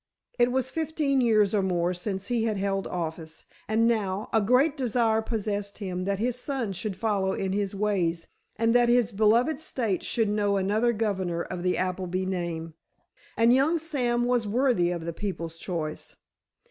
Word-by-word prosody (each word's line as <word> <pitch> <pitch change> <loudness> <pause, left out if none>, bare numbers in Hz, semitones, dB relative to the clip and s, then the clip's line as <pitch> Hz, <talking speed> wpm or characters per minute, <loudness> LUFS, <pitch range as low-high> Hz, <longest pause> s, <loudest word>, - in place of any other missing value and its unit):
It 240 0 +4
was 260 0 0
fifteen 305 -4 0
years 215 -4 +3
or 205 - +3
more 180 -2 0
since 190 +2 -4
he 235 -2 +1
had 215 -2 0
held 195 0 -1
office, 160 -2 -5 0.2
and 225 +2 +2
now, 210 -3 -1
a 225 - +4
great 255 +8 +3
desire 230 -4 +1
possessed 205 -2 -3
him 185 -3 -4
that 200 0 0
his 245 +3 -1
son 250 -7 -2
should 195 +2 -4
follow 195 -2 0
in 190 -1 -2
his 200 -1 -1
ways, 180 -5 0 0.3
and 230 +1 +2
that 240 -1 +4
his 240 -2 +3
beloved 230 +8 +3
state 230 -10 -2
should 225 -2 0
know 205 -1 +1
another 210 +5 +2
governor 190 -6 -1
of 180 -1 -6
the 180 0 +1
Appleby 185 0 -2
name. 170 -3 -3 0.6
And 230 +1 +5
young 285 +6 +3
Sam 250 -7 0
was 245 -3 +1
worthy 235 -6 +2
of 170 -2 -3
the 170 - -3
people's 165 -4 -5
choice. 165 -4 -5
205 Hz, 170 wpm, -27 LUFS, 185-240 Hz, 0.6 s, And